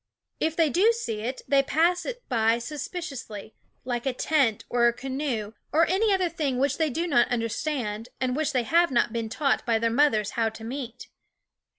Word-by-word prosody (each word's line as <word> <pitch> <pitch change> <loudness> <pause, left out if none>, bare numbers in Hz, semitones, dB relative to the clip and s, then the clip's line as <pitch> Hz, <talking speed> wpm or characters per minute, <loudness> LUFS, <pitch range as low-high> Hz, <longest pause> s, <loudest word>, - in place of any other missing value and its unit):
If 320 0 0
they 320 -3 +3
do 400 - +4
see 230 - -4
it, 250 +4 -4
they 275 +1 +4
pass 330 +6 +1
it - - -6
by 225 -2 +2
suspiciously, 260 - -6 0.3
like 245 0 -2
a 265 - +1
tent, 260 -5 +1
or 240 -1 +3
a 235 - +2
canoe, 260 -5 -3 0.2
or 320 +3 +4
any 410 +4 +2
other 375 -2 +2
thing 300 -6 -2
which 280 +3 0
they 320 -1 +2
do 330 +6 -2
not 275 -8 +3
understand, 230 -1 -2
and 255 -1 0
which 305 0 0
they 255 -3 +1
have 340 +8 +3
not 240 -3 +1
been 230 -1 -2
taught 275 +5 0
by 230 -2 +2
their 230 +1 0
mothers 225 -6 +2
how 225 -1 0
to 220 0 -11
meet. 245 0 -6
260 Hz, 195 wpm, -26 LUFS, 230-315 Hz, 0.3 s, do